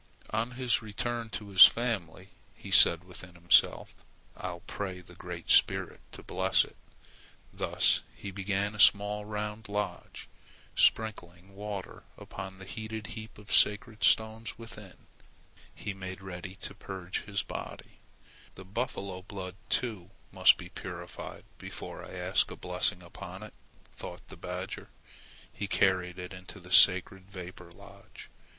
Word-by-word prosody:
On 115 Hz, +3 st, -1 dB
his 125 Hz, -2 st, +1 dB
return 115 Hz, +2 st, -3 dB
to 105 Hz, -1 st, -6 dB
his 95 Hz, -1 st, +10 dB
family, 100 Hz, -6 st, -3 dB, 0.3 s
he -, -, -10 dB
said 85 Hz, 0 st, +7 dB
within 90 Hz, -1 st, -12 dB
himself: 85 Hz, 0 st, +3 dB, 0.4 s
"I'll 90 Hz, -2 st, -6 dB
pray 95 Hz, -3 st, -5 dB
the 90 Hz, 0 st, -15 dB
Great 90 Hz, -1 st, -5 dB
Spirit -, -, +4 dB
to -, -, -9 dB
bless -, -, +2 dB
it." -, -, -17 dB, 0.8 s
Thus -, -, +3 dB
he 100 Hz, -, -7 dB
built 100 Hz, +1 st, -7 dB, 0.2 s
a 105 Hz, -, -10 dB
small 105 Hz, +1 st, +5 dB
round 105 Hz, 0 st, -5 dB
lodge. 105 Hz, 0 st, -4 dB, 0.5 s
Sprinkling 95 Hz, -4 st, +1 dB
water 100 Hz, -2 st, -6 dB, 0.2 s
upon 95 Hz, 0 st, -8 dB
the 95 Hz, -, -10 dB
heated 110 Hz, +1 st, -6 dB
heap 110 Hz, 0 st, -9 dB
of 105 Hz, -1 st, -6 dB
sacred 105 Hz, 0 st, +3 dB
stones 110 Hz, +3 st, +2 dB
within, 105 Hz, -4 st, -11 dB, 0.7 s
he 100 Hz, -, -6 dB
made 95 Hz, 0 st, -7 dB
ready 90 Hz, 0 st, -7 dB
to 100 Hz, -, -7 dB
purge 95 Hz, -1 st, -5 dB
his 100 Hz, -1 st, -1 dB
body. -, -, -8 dB, 0.6 s
"The 95 Hz, -, -10 dB
buffalo 100 Hz, -3 st, -3 dB
blood, 95 Hz, -1 st, -7 dB, 0.2 s
too, 105 Hz, -8 st, -1 dB, 0.2 s
must -, -, +6 dB
be -, -, -9 dB
purified -, -, -8 dB, 0.2 s
before -, -, -7 dB
I -, -, -10 dB
ask -, -, +2 dB
a -, -, -7 dB
blessing 90 Hz, -, -1 dB
upon 95 Hz, +2 st, -9 dB
it," 105 Hz, -, -10 dB, 0.4 s
thought -, -, -9 dB
the -, -, -9 dB
badger. 90 Hz, +1 st, -6 dB, 0.6 s
He 100 Hz, -, -4 dB
carried 90 Hz, -2 st, +2 dB
it 90 Hz, +1 st, -7 dB
into 90 Hz, 0 st, -10 dB
the 90 Hz, +1 st, -14 dB
sacred 95 Hz, 0 st, +6 dB
vapor 90 Hz, -2 st, -9 dB
lodge. 85 Hz, -, -14 dB
95 Hz, 140 wpm, -30 LUFS, 90-105 Hz, 0.8 s, his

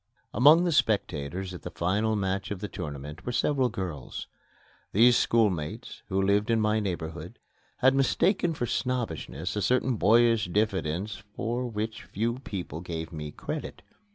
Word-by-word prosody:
Among 150 Hz, +9 st, +7 dB
the 175 Hz, -, +1 dB
spectators 95 Hz, -, 0 dB
at 90 Hz, -, -8 dB
the -, -, -6 dB
final 105 Hz, +6 st, 0 dB
match 95 Hz, -1 st, -1 dB
of 100 Hz, -, -4 dB
the 105 Hz, -, -4 dB
tournament 75 Hz, -4 st, -7 dB
were 125 Hz, -, -3 dB
several 130 Hz, 0 st, +2 dB
girls. 90 Hz, -, -5 dB, 0.7 s
These 120 Hz, +4 st, +6 dB
schoolmates, 100 Hz, -13 st, 0 dB
who 95 Hz, -, 0 dB
lived 100 Hz, +2 st, +2 dB
in 115 Hz, -1 st, +3 dB
my 110 Hz, 0 st, +2 dB
neighborhood, 85 Hz, -5 st, -4 dB, 0.4 s
had 130 Hz, +1 st, +5 dB
mistaken 170 Hz, +5 st, +2 dB
for 120 Hz, -, -1 dB
snobbishness 90 Hz, -, -2 dB
a 105 Hz, -, -1 dB
certain 125 Hz, +4 st, +2 dB
boyish 115 Hz, +1 st, +4 dB
diffidence 100 Hz, 0 st, -1 dB
for 120 Hz, +2 st, -2 dB
which 110 Hz, 0 st, -4 dB
few 115 Hz, +4 st, -2 dB
people 90 Hz, -, -6 dB
gave 85 Hz, -1 st, -5 dB
me 75 Hz, -1 st, -5 dB
credit. -, -, -6 dB
105 Hz, 150 wpm, -28 LUFS, 90-120 Hz, 0.7 s, Among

